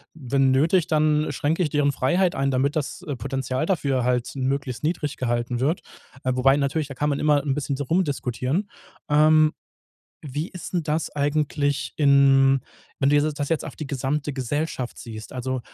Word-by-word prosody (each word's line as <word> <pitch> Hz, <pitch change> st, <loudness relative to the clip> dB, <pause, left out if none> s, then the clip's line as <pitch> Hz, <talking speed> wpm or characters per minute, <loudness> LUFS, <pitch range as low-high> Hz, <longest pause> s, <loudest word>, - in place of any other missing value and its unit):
wenn 135 Hz, -2 st, +1 dB
nötig, 160 Hz, +6 st, +3 dB
dann 155 Hz, -1 st, +2 dB
schränke 160 Hz, +5 st, -1 dB
ich 165 Hz, -, +1 dB
deren 145 Hz, -1 st, +2 dB
Freiheit 175 Hz, +8 st, +1 dB
ein, 135 Hz, 0 st, 0 dB
damit 135 Hz, +2 st, +1 dB
das, 155 Hz, +3 st, -3 dB
äh, 145 Hz, -, -2 dB
Potenzial 130 Hz, +4 st, -2 dB
dafür 140 Hz, -9 st, 0 dB
halt 125 Hz, -1 st, 0 dB
möglichst 135 Hz, -1 st, -2 dB
niedrig 155 Hz, -2 st, -2 dB
gehalten 120 Hz, 0 st, -1 dB
wird. 150 Hz, +7 st, 0 dB, 0.4 s
Äh, 130 Hz, -, +1 dB
wobei 135 Hz, +2 st, +4 dB
natürlich, 145 Hz, +1 st, -1 dB
da 135 Hz, -, -8 dB
kann 150 Hz, +3 st, 0 dB
man 140 Hz, -, -1 dB
immer 150 Hz, -2 st, +3 dB
'n 140 Hz, -2 st, 0 dB
bisschen 140 Hz, -1 st, -2 dB
so 145 Hz, -, -2 dB
rumdiskutieren. 145 Hz, -, -1 dB, 0.4 s
Ähm, 155 Hz, +1 st, +5 dB, 0.7 s
wie 150 Hz, +4 st, -4 dB
ist 180 Hz, -, -9 dB
denn 175 Hz, -2 st, 0 dB
das 155 Hz, 0 st, -2 dB
eigentlich 145 Hz, -1 st, 0 dB
in 135 Hz, -2 st, +5 dB, 0.4 s
wenn 135 Hz, -, +2 dB
du 145 Hz, 0 st, +4 dB
das 145 Hz, -1 st, -3 dB
jetzt 165 Hz, -, 0 dB
auf -, -, -8 dB
die 155 Hz, -, -5 dB
gesamte 140 Hz, +2 st, -2 dB
Gesellschaft 135 Hz, 0 st, -3 dB
siehst? 110 Hz, -2 st, -9 dB
Also, 130 Hz, 0 st, -3 dB
140 Hz, 175 wpm, -24 LUFS, 130-150 Hz, 0.7 s, Ähm